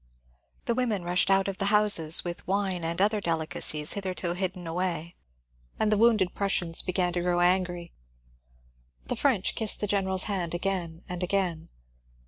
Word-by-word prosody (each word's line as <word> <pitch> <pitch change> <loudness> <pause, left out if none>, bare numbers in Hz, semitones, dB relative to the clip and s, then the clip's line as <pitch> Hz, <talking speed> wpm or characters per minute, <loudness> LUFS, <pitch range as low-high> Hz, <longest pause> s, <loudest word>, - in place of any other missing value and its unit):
The 235 - +1
women 230 -6 -1
rushed 175 +2 +2
out 195 0 +3
of 195 -1 -4
the 195 - +2
houses 200 -6 +4
with 175 -1 -7
wine 190 -2 -1
and 165 +1 -1
other 210 +2 +2
delicacies, 155 -3 0
hitherto 185 -3 -2
hidden 180 -1 -4
away, 170 -1 -3 0.7
and 215 - +1
the 210 - +3
wounded 215 -5 +3
Prussians 180 -4 0
began 180 -1 -1
to 175 - -1
grow 175 0 0
angry. 175 -1 0 1.1
The - - -3
French 240 -9 +1
kissed 220 -2 +2
the - - -1
general's 190 -2 +1
hand 180 -5 -2
again 175 -3 -3
and 180 0 -6
again. 180 -3 -2
185 Hz, 155 wpm, -27 LUFS, 175-200 Hz, 1.1 s, houses